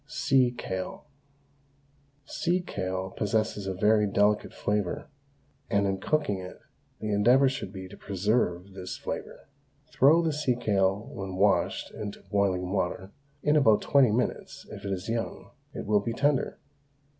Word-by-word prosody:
SEA 130 -3 +3
KALE. 95 -1 -5 1.2
Sea 175 +5 0
kale 95 - -4
possesses 105 -1 -1
a 95 - -1
very 105 +2 +3
delicate 105 +1 +2
flavour, 105 -3 -2 0.6
and 100 -3 +2
in 95 -1 -1
cooking 145 -4 0
it 90 0 -9 0.4
the 110 - -3
endeavour 120 +7 +5
should 130 -8 -3
be 95 -2 -8
to 100 - -12
preserve 100 -2 -1
this 95 -1 -6
flavour. - - -6 0.5
Throw 155 +6 +5
the 160 -2 0
sea 140 -4 0
kale 100 -2 +1
when 95 -1 -5
washed 100 +1 +1
into 105 -1 -7
boiling 95 -3 +1
water; 95 0 -2 0.3
in 150 +1 +3
about 110 -8 +4
twenty 140 -4 +5
minutes, 120 +4 -2
if - - -9
it 100 - -2
is 95 -1 -4
young, 115 0 -4 0.2
it - - -6
will 105 0 +3
be 115 +3 -3
tender. 145 +2 +1
105 Hz, 145 wpm, -28 LUFS, 95-125 Hz, 1.2 s, endeavour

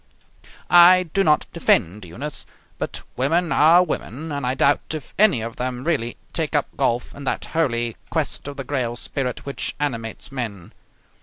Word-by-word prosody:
I 175 -1 +7
do 195 - +3
not 150 -4 +3
defend 95 +4 +1
Eunice, 130 - -6 0.3
but - - -5
women 165 +6 +1
are 165 +4 +6
women, 160 -2 -5
and 140 -3 -2
I 130 - 0
doubt 145 0 +3
if 155 - -8
any 200 - +5
of 115 +1 -6
them 125 0 -3
really 135 -8 -1 0.2
take - - -1
up - - -1
golf 120 +1 0
in 140 - -10
that - - -2
holy, 120 -8 0
quest - - -3
of 145 0 -7
the 135 - -4
grail 125 -3 -2
spirit 125 +1 -2
which 140 - -3
animates 120 -4 -3
men. 110 -9 -6
135 Hz, 165 wpm, -22 LUFS, 120-160 Hz, 0.3 s, I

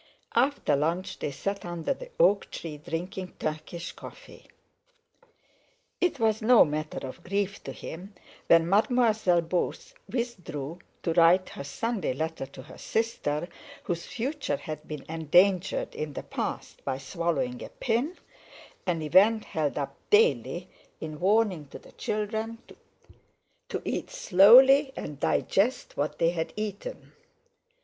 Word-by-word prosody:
After 265 - +2
lunch 175 +6 -1
they - - -2
sat 200 +8 -4
under 175 -2 -2
the - - -10
oak 200 +1 +4
tree 155 -3 -6
drinking 175 +4 -5
Turkish 155 +2 -4
coffee. - - -13 1.5
It 360 -6 +1
was 220 -1 +2
no 240 +2 +7
matter 155 -1 -4
of 150 +6 -10
grief 200 +1 -2
to - - -4
him 190 +5 -9 0.3
when 165 0 +6
Mademoiselle 215 -3 +3
Beauce 170 +2 -2 0.2
withdrew 180 - -4 0.2
to 165 - 0
write 175 +2 +5
her - - -7
Sunday 195 - -2
letter 160 0 -3
to 135 -1 -11
her 150 - -13
sister, 175 -9 -1 0.4
whose 170 -1 -3
future 275 +5 -2
had 155 - -7
been 150 -3 -7
endangered 175 +4 +2
in 150 -1 -4
the - - -5
past - - -5
by 130 -1 -2
swallowing 135 -4 -2
a - - -8
pin—an 230 - -4
event 205 +8 +5
held 150 -3 -2
up 140 - -3
daily 450 +3 +3 0.3
in 155 -1 -6
warning 195 -5 +2
to - - -9
the - - -17
children 220 +2 -3 1.1
to - - -2
eat - - -2
slowly 265 - +7
and 145 -2 -6
digest 220 +11 +1
what 150 +1 -2
they 165 +1 +3
had 165 -2 -3
eaten. 215 - -6
180 Hz, 130 wpm, -28 LUFS, 155-225 Hz, 1.5 s, no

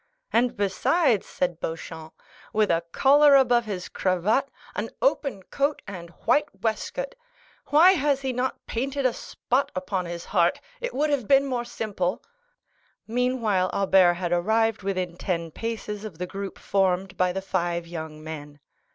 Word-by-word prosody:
"And 240 +1 +2
besides," 215 - +2
said 175 -2 -2
Beauchamp, 160 -1 -6 0.3
"with 215 -2 +3
a 165 0 +2
collar 285 - +6
above 245 -3 +4
his 190 -4 -4
cravat, 200 +9 +1 0.3
an - - -2
open 275 - 0
coat 285 +8 -1
and 180 -4 -8 0.2
white 290 +6 +3
waistcoat! - - -2 0.5
Why 325 +6 +7
has 285 -6 +1
he 265 -1 -2
not 250 +1 -2
painted 270 +3 -2
a 255 - +3
spot 255 +3 -1
upon 185 -1 -2
his 170 0 -6
heart?—it 350 - -1
would 300 +1 +1
have 260 -7 0
been 275 0 +5
more 250 -3 -2
simple." 200 -6 -3 0.8
Meanwhile 230 -6 +1
Albert 190 -3 +4
had 175 -1 -3
arrived 220 +5 +2
within 185 -3 -2
ten 170 -3 -2
paces 215 0 -5
of 205 -7 -8
the 180 - -3
group 195 +1 -6
formed 190 0 0
by 180 -1 +2
the 190 +1 -4
five 175 -3 -1
young 160 -2 -7
men. 150 -2 -8
205 Hz, 150 wpm, -25 LUFS, 180-260 Hz, 0.8 s, Why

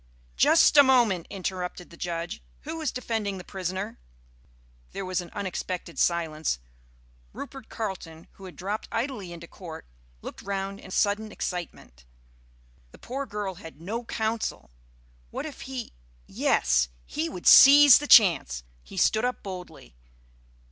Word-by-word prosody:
"Just 320 - +5
a - - +12
moment," 240 - +3
interrupted 180 -2 -5
the - - -12
Judge. 170 +3 -4 0.2
"Who 320 +2 -6
is 310 - -1
defending 220 -5 -3
the 180 - -8
prisoner?" 190 +3 -5 0.9
There - - -4
was 185 0 -1
an 175 - -10
unexpected 185 -3 -5
silence. 160 - 0 0.8
Rupert 270 -4 -9
Carleton, 175 -7 -6
who 195 - -14
had 185 - -10
dropped 205 +4 -4
idly 230 -6 -3
into 170 0 -9
court, 165 -4 -10 0.4
looked - - -8
round 195 0 -4
in 190 - -12
sudden 210 +3 0
excitement. 170 - -6 0.8
The - - -16
poor 270 +3 -5
girl 205 -2 -4
had 165 -4 -12
no 215 +8 -4
counsel! 220 - -3 0.6
What - - -5
if 300 -3 -8
he 255 -3 -6 0.3
yes, - - +2 0.2
he 155 - -3
would 180 - -9
seize 285 -1 +9
the 295 - -5
chance! 150 - +6 0.2
He - - -13
stood 215 - +3
up 250 0 -2
boldly. 180 - -9
190 Hz, 140 wpm, -26 LUFS, 170-225 Hz, 0.9 s, a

